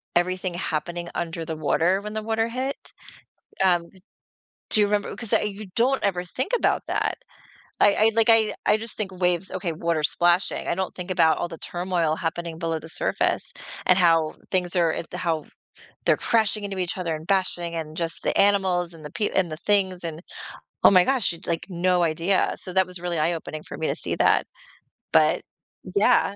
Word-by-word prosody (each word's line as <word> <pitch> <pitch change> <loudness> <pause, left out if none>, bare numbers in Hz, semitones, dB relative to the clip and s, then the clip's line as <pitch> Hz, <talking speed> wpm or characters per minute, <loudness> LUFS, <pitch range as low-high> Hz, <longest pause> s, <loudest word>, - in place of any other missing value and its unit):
everything 185 +1 0
happening 175 0 -3
under 165 -1 -4
the 160 0 -4
water 165 +5 +1
when 210 +1 -7
the 215 0 -3
water 225 +1 0
hit. 260 +4 -4 0.7
Um, 175 -2 +2
d 190 - -19 0.7
do 215 - +5
you 205 - +5
remember 205 0 -1
'cause 225 -3 -3
I - - +3
you 210 0 -4
don't 260 +3 +2
ever 180 -3 0
think 255 - -4
about - - +1
that. - - -1 0.6
I 205 - +5
I 220 +1 +4
like, 225 -1 +3
I 220 -2 +5
I - - +5
just 225 +1 0
think 205 -3 -3
waves, 180 0 0
okay, 180 -2 -2
water 165 -1 -1
splashing, 175 +4 +2
I - - 0
don't 190 0 -3
think 180 0 -6
about 165 -3 +3
all - - -2
the 165 -1 -9
turmoil 175 -3 -1
happening 170 -1 -4
below 165 -2 -2
the 160 +1 -9
surface - - 0 0.3
and 185 - +5
how 165 -3 +3 0.2
things 180 -1 0
are, 170 -3 +3
uh, - - -3
the 180 - -5
how 165 -4 -1 0.6
they're - - +4
crashing 220 -2 +1
into 195 -1 -4
each 180 -2 -2
other 170 -3 -2
and 155 +1 -11
bashing 180 -3 0
and 160 -1 -5
just 165 -1 -2
the - - -1
animals 185 -4 +2
and 160 -2 -13
the 150 - -7
pe 210 - 0
and 185 -3 +1
the 155 - -5
things 190 -1 +1
and 165 -1 -5 0.6
Oh - - +8
my 185 -2 +6
gosh, 260 -4 +1
it's 170 - -12
like 170 -1 -2
no 180 0 +1
idea, 170 +4 +1
so 185 - -3
that 190 0 +3
was 180 -1 -4
really 175 -1 -3
eye 160 +3 +1
opening 155 -2 -6
for - - -7
me 160 - -2
to - - -1
see - - -1
that, - - +3 0.7
but - - +4 0.5
Yeah. 205 -1 +3
180 Hz, 205 wpm, -24 LUFS, 165-200 Hz, 0.7 s, Oh